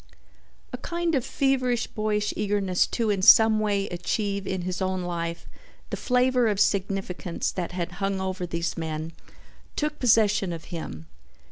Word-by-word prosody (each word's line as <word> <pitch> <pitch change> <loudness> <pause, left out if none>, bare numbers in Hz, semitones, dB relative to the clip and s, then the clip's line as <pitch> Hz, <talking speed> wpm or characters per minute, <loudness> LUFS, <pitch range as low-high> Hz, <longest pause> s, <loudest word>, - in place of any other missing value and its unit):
A - - -4
kind 340 -1 -2
of 265 -5 +2
feverish 255 -3 +1
boyish 210 -1 -1
eagerness 200 -3 +1
to 225 -3 0
in 195 -2 0
some 220 +3 +7
way 205 -2 0
achieve 200 +3 -2
in 190 -2 -2
his 185 +1 -3
own 185 -1 -1
life 170 -1 -4 0.4
the - - -1
flavor 250 -1 +2
of 205 -2 0
significance 195 -3 -1
that 180 -1 -4
had 175 -1 -3
hung 195 0 0
over 185 -1 -3
these 170 0 -2
men 160 0 -4 0.6
took 300 0 -2
possession 210 -5 +3
of 165 -1 -7
him. 80 - -6
195 Hz, 150 wpm, -26 LUFS, 180-220 Hz, 0.6 s, some